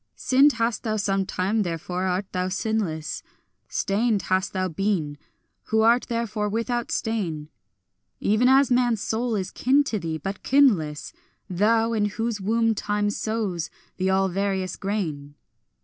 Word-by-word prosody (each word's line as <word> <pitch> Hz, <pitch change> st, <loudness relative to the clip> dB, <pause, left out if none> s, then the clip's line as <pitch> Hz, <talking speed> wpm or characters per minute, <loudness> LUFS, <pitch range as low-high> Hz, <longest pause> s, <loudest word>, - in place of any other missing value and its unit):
Sinned 275 Hz, +3 st, +4 dB
hast 230 Hz, -1 st, -1 dB
thou 215 Hz, -2 st, -1 dB
sometime, 195 Hz, 0 st, 0 dB
therefore 180 Hz, 0 st, -3 dB
art 185 Hz, +2 st, -1 dB
thou 185 Hz, 0 st, -1 dB
sinless; 190 Hz, -6 st, -2 dB, 0.5 s
Stained 210 Hz, +1 st, 0 dB
hast 185 Hz, 0 st, +1 dB
thou 185 Hz, 0 st, -1 dB
been, 175 Hz, -4 st, -1 dB, 0.5 s
who 220 Hz, 0 st, +2 dB
art 235 Hz, +3 st, +4 dB
therefore 225 Hz, -3 st, -2 dB
without 230 Hz, +3 st, -2 dB
stain; 170 Hz, -10 st, -2 dB, 0.7 s
Even 215 Hz, +4 st, +3 dB
as 270 Hz, 0 st, +5 dB
man's 245 Hz, -3 st, +3 dB
soul 225 Hz, +3 st, -1 dB
is 190 Hz, -2 st, -3 dB
kin 275 Hz, +4 st, +3 dB
to 225 Hz, -6 st, -2 dB
thee, 160 Hz, -3 st, -3 dB
but 195 Hz, +4 st, -5 dB
kinless 200 Hz, -, +2 dB, 0.3 s
Thou, 225 Hz, +5 st, +2 dB
in 210 Hz, -2 st, +1 dB
whose 220 Hz, +1 st, -2 dB
womb 225 Hz, +3 st, +2 dB
Time 205 Hz, 0 st, -1 dB
sows 210 Hz, -6 st, -2 dB, 0.3 s
the 190 Hz, 0 st, 0 dB
all 190 Hz, 0 st, +3 dB
various 190 Hz, -1 st, -1 dB
grain. 160 Hz, -9 st, -3 dB
205 Hz, 140 wpm, -24 LUFS, 185-230 Hz, 0.7 s, as